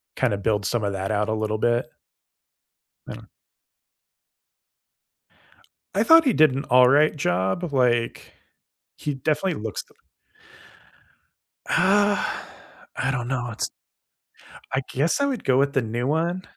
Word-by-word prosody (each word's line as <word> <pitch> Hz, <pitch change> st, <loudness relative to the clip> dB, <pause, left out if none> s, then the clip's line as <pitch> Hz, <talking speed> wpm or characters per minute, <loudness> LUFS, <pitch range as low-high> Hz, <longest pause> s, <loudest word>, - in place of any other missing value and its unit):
kinda 115 Hz, -6 st, 0 dB
build 105 Hz, -1 st, -1 dB
some 115 Hz, -1 st, -1 dB
of 100 Hz, -1 st, -1 dB
that 95 Hz, +2 st, -3 dB
out 105 Hz, +1 st, 0 dB
a -, -, 0 dB
little 110 Hz, 0 st, -2 dB
bit. 120 Hz, +2 st, 0 dB, 1.2 s
I -, -, -6 dB
don't -, -, -13 dB, 2.7 s
I 205 Hz, -, +3 dB
thought 325 Hz, +3 st, +7 dB
he 255 Hz, -, +3 dB
did 155 Hz, -2 st, +5 dB
an 135 Hz, +2 st, -4 dB
all 125 Hz, 0 st, +6 dB
right 150 Hz, +3 st, +4 dB
job. 95 Hz, -, -1 dB
Like, 120 Hz, -3 st, 0 dB, 0.6 s
he 145 Hz, -2 st, -4 dB
definitely 150 Hz, -, -1 dB
looks 110 Hz, -1 st, -5 dB
the -, -, -27 dB, 1.7 s
Ah, 205 Hz, +2 st, +1 dB, 0.5 s
I 135 Hz, -, -1 dB
don't 120 Hz, -2 st, -3 dB
know. 125 Hz, -2 st, -3 dB
It's 110 Hz, -, -3 dB, 1.0 s
I 130 Hz, +1 st, 0 dB
guess 150 Hz, -, 0 dB
I 280 Hz, -, +2 dB
would 265 Hz, -4 st, -3 dB
go 130 Hz, -1 st, +2 dB
with 140 Hz, +1 st, +1 dB
the 135 Hz, -, +2 dB
new 120 Hz, +3 st, -3 dB
one. 170 Hz, +4 st, -1 dB
130 Hz, 140 wpm, -23 LUFS, 110-155 Hz, 2.7 s, thought